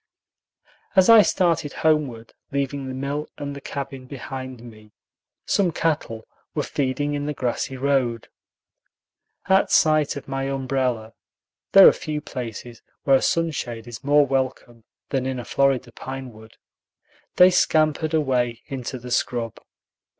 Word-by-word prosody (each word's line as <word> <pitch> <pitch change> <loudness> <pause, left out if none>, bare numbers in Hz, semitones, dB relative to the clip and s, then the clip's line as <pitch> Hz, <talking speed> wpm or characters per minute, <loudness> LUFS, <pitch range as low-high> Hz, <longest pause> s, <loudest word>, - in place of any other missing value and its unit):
As 190 +1 +5
I 225 -1 +10
started 170 -7 +1
homeward, 140 -8 +1 0.2
leaving 140 0 -2
the 130 - -5
mill 140 +3 -3
and 140 -1 -5
the 140 - -9
cabin 135 -2 -6
behind 130 -2 -7
me, 110 -3 -14 0.5
some 190 -4 +2
cattle 150 -10 -2 0.3
were - - 0
feeding 145 +2 -1
in 145 0 -3
the 150 - -3
grassy 130 +1 -2
road. 130 -4 0 1.2
At 190 0 +4
sight 155 -1 +3
of 140 - -8
my 135 0 -3
umbrella 130 -5 -2 0.6
(there 195 -1 +10
are - - +7
few 155 -2 -4
places 120 -4 -7 0.2
where 135 -1 +5
a - - -3
sunshade 130 -9 -1
is 120 -1 -9
more 145 +1 +4
welcome 130 -4 -3 0.2
than 130 -2 -1
in 130 -1 -2
a 120 - -6
Florida 135 -3 +1
pine 130 +1 -7
wood) 110 0 -16 0.8
they 180 +1 +7
scampered 155 -2 +2
away 125 -6 0
into 130 -1 -5
the 125 0 -9
scrub. 120 -2 -1
135 Hz, 140 wpm, -23 LUFS, 125-145 Hz, 1.2 s, I